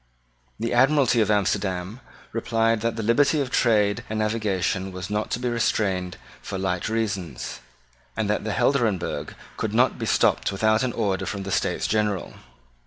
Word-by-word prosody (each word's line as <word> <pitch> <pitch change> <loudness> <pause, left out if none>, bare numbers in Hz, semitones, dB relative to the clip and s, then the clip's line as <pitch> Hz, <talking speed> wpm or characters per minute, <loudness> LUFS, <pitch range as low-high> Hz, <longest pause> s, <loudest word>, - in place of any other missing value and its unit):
The 115 +2 -1
Admiralty 130 -1 +4
of 105 - +1
Amsterdam 100 0 0 0.3
replied 115 -1 +1
that 115 0 -1
the 115 - -3
liberty 140 +7 +3
of 135 -3 -2
trade 105 -4 +2
and 110 - -2
navigation 100 -3 -1
was 95 +2 -6
not 105 +1 -1
to - - -1
be 125 - -2
restrained 95 -6 0 0.2
for 95 - -5
light 95 0 -1
reasons, 105 -6 -3 0.6
and 110 -2 0
that 105 - 0
the 110 - -3
Helderenbergh 105 - 0 0.2
could - - -2
not - - +3
be - - -2
stopped - - +2
without 110 +2 +2
an 130 -2 -1
order 100 -4 -1
from 100 -2 -4
the 95 - -5
States - - 0
General. 105 -4 0
110 Hz, 165 wpm, -24 LUFS, 95-115 Hz, 0.6 s, Admiralty